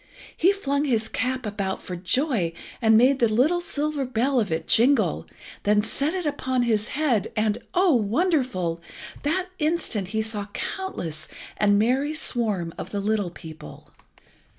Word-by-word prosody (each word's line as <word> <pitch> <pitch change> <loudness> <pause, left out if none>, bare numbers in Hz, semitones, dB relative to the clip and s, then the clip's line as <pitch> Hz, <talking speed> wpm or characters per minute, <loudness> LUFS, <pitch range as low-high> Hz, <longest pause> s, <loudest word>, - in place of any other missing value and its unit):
He 365 +4 +4
flung 285 -7 -1
his 225 -5 +1
cap 255 +1 -2
about 200 -2 -3
for 180 - -6
joy 190 - 0 0.3
and 220 -1 +5
made 260 +4 +4
the 235 -2 +3
little 300 +11 +3
silver 300 -3 -1
bell 255 +1 +1
of 210 -6 -1
it 160 0 -2
jingle, 265 +5 +3 0.3
then 210 0 +3
set 280 - 0
it 365 -3 -3
upon 260 -4 0
his 220 -3 +1
head, 260 -10 +1
and 215 -1 +1 0.2
oh 360 -2 +4
wonderful! 235 - 0 0.4
that 360 +5 -1
instant 300 - 0
he 220 +3 -1
saw 220 -1 -3
the 205 - -9 0.2
countless 165 - -5 0.3
and 205 -1 +3
merry 265 +8 +1
swarm 210 - 0
of - - -6
the 205 - -3
little 205 -2 0
people. 160 -2 -12
235 Hz, 155 wpm, -24 LUFS, 205-285 Hz, 0.4 s, and